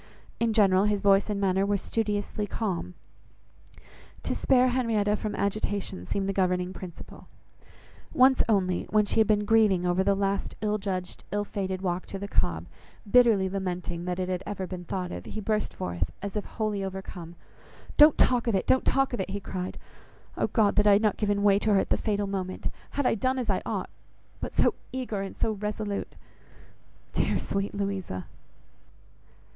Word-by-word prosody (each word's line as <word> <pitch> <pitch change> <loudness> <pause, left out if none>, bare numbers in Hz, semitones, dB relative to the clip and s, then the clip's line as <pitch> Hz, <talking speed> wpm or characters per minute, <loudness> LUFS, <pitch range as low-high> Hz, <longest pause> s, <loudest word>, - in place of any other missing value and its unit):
In 230 -1 +2
general, 200 -3 +4
his 210 -1 +1
voice 200 +1 +4
and 205 -1 -1
manner 190 -1 +2
were 200 0 +1
studiously 210 0 -2
calm. 180 - -3 1.3
To - - -1
spare 255 -1 +3
Henrietta 225 -5 +1
from 210 0 -4
agitation 200 - -2
seemed 195 -1 -1
the 195 - 0
governing 180 -1 0
principle. 180 -3 -10 0.8
Once 260 -3 +5
only, 185 -4 +1
when 215 -1 +3
she 205 - 0
had 220 - +5
been 210 -1 +2
grieving 205 -5 +4
over 180 +1 +2
the 200 +1 +3
last 195 0 -1
ill 210 0 0
judged, 185 -2 -4
ill 205 +1 0
fated 190 -2 -4
walk 180 0 -2
to 195 - -5
the 200 +1 -5
Cobb, 85 - 0 0.5
bitterly 230 -6 +5
lamenting 180 -2 -3
that 180 -1 -2
it 185 -1 -2
ever 200 -2 -4
had 185 - -7
been 180 -1 -6
thought 180 0 -3
of, - - -6
he 220 - -6
burst 215 0 -1
forth, 85 -2 -3
as 200 0 -6
if 210 - -2
wholly 215 -3 -2
overcome— 190 -3 -7 0.6
"Don't 300 0 +7
talk 245 -1 +3
of 230 - +2
it, 190 - 0
don't 260 - +3
talk 270 -1 +2
of 240 - -2
it," 190 - -2
he 200 +1 -3
cried. 185 -1 -5 0.6
"Oh - - 0
God! 215 -4 +2
that 210 0 +5
I 205 - +8
had 205 +2 +4
not 210 -3 +2
given 205 -1 0
way 200 -1 +5
to 210 -1 +2
her - - +5
at - - -2
the - - +5
fatal 205 -2 -1
moment! 190 -2 -3 0.2
Had 285 - -2
I - - +4
done 255 +4 0
as 240 -5 0
I 190 - 0
ought! - - -3 0.5
But - - -6
so - - +4 0.2
eager 250 -6 -3
and 195 - -6
so 220 - +1
resolute! 210 0 -4 1.0
Dear, - - +1
sweet 195 +1 -3
Louisa!" 195 - -3
200 Hz, 185 wpm, -27 LUFS, 185-215 Hz, 1.3 s, I